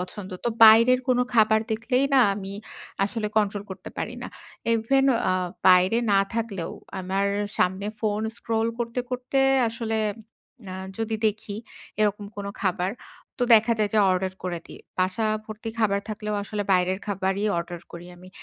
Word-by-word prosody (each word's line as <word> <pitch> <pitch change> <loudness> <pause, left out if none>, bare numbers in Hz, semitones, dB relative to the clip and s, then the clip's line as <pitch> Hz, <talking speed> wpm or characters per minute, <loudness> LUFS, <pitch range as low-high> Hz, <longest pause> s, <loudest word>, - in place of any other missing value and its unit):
পছন্দ, 185 +2 -7
তো - - +2 0.2
বাইরের 230 +3 +7
কোনো 250 -1 +3
খাবার 220 -1 +5
দেখলেই 245 +4 +1
না 265 - +7
আমি 195 -1 -6 0.5
আসলে 215 +1 -3
কন্ট্রোল 205 -1 +1
করতে 185 -1 -8
পারি - - -3
না। - - -5 0.4
ইভেন 270 +5 +2 0.2
আ - - +3 0.4
বাইরে 185 +5 +5
না 195 - +5
থাকলেও 215 -7 -3 0.3
আমার 190 +2 0 0.3
সামনে 190 +2 +1
ফোন 215 -1 0 0.2
স্ক্রল 225 0 -1
করতে, 235 +1 -2
করতে 250 +2 -2 0.3
আসলে 225 -1 -2 0.7
আ - - -5 0.2
যদি 225 0 -1
দেখি, 210 -1 -3 0.4
এরকম 210 -1 +1
কোন 200 -1 -5 0.2
খাবার 185 0 0 0.5
তো - - 0
দেখা 225 +1 +4
যায় 210 -2 +1
যে - - +4
অর্ডার 185 0 0
করে 175 -2 -2
দিই। - - -12 0.2
বাসা 185 +4 +1 0.2
ভর্তি 215 +1 -6
খাবার 200 -3 +2
থাকলেও 210 0 -3
আসলে 205 0 -3
বাইরের 185 0 +2
খাবারই 195 0 -1
অর্ডার 170 0 -5
করি 170 +1 -9
আমি। 180 +1 -14
210 Hz, 155 wpm, -25 LUFS, 190-225 Hz, 0.7 s, বাইরের